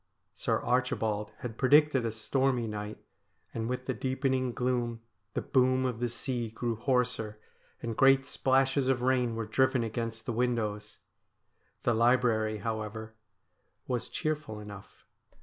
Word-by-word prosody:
Sir -, -, 0 dB
Archibald 110 Hz, -4 st, 0 dB
had 115 Hz, -2 st, -6 dB
predicted 140 Hz, -2 st, +5 dB
a -, -, -2 dB
stormy 125 Hz, +3 st, 0 dB
night, 105 Hz, -1 st, -5 dB, 0.6 s
and 115 Hz, +1 st, -2 dB
with 125 Hz, 0 st, -3 dB
the 130 Hz, -, -1 dB
deepening 130 Hz, +1 st, 0 dB
gloom 120 Hz, -1 st, -1 dB, 0.3 s
the -, -, -1 dB
boom 130 Hz, 0 st, +3 dB
of 125 Hz, -3 st, -2 dB
the 120 Hz, 0 st, 0 dB
sea 120 Hz, -1 st, -3 dB
grew 115 Hz, +1 st, -2 dB
hoarser, 120 Hz, -3 st, 0 dB, 0.5 s
and 115 Hz, -1 st, -3 dB
great 135 Hz, +2 st, +5 dB
splashes 135 Hz, 0 st, +2 dB
of 125 Hz, -2 st, +1 dB
rain 125 Hz, -3 st, +2 dB
were 115 Hz, 0 st, -2 dB
driven 130 Hz, +3 st, +2 dB
against 115 Hz, 0 st, -4 dB
the 120 Hz, -, -2 dB
windows. 110 Hz, -3 st, -1 dB, 0.9 s
The 120 Hz, -, +3 dB
library, 115 Hz, -2 st, +3 dB
however, 110 Hz, +1 st, -4 dB, 0.7 s
was 125 Hz, -2 st, -2 dB
cheerful 150 Hz, -8 st, -3 dB
enough. 105 Hz, -2 st, -11 dB
120 Hz, 135 wpm, -30 LUFS, 110-130 Hz, 0.9 s, predicted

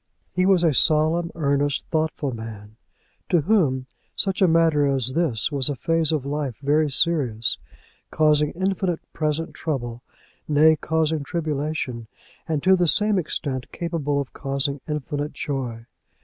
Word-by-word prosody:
He 185 Hz, 0 st, +1 dB
was 190 Hz, -3 st, +4 dB
a 160 Hz, -3 st, +3 dB
solemn, 155 Hz, +5 st, +3 dB
earnest, 145 Hz, -2 st, 0 dB
thoughtful 155 Hz, -5 st, -1 dB
man; 110 Hz, -2 st, -9 dB, 0.5 s
to 175 Hz, -, +3 dB
whom 150 Hz, -9 st, +1 dB, 0.3 s
such 195 Hz, -1 st, +1 dB
a 190 Hz, -, +6 dB
matter 160 Hz, -3 st, +3 dB
as 130 Hz, -2 st, +1 dB
this 150 Hz, -7 st, 0 dB
was 140 Hz, -2 st, +3 dB
a 145 Hz, -, -2 dB
phase 165 Hz, +4 st, +1 dB
of 150 Hz, -4 st, -1 dB
life 140 Hz, -4 st, -3 dB
very 150 Hz, +2 st, +1 dB
serious, 135 Hz, -7 st, +2 dB, 0.5 s
causing 150 Hz, -1 st, +3 dB
infinite 185 Hz, -1 st, -1 dB
present 155 Hz, +1 st, -2 dB
trouble, 120 Hz, -6 st, -4 dB, 0.5 s
nay, 155 Hz, +1 st, +5 dB
causing 160 Hz, 0 st, -1 dB
tribulation, 150 Hz, -6 st, -3 dB, 0.4 s
and, 155 Hz, -3 st, -1 dB
to 190 Hz, +1 st, +5 dB
the 180 Hz, -2 st, +1 dB
same 210 Hz, +3 st, +3 dB
extent, 135 Hz, -5 st, -3 dB
capable 160 Hz, -5 st, -2 dB
of 140 Hz, -3 st, -5 dB
causing 140 Hz, 0 st, -2 dB
infinite 150 Hz, -1 st, -3 dB
joy. 125 Hz, -5 st, -4 dB
150 Hz, 140 wpm, -23 LUFS, 135-165 Hz, 0.5 s, a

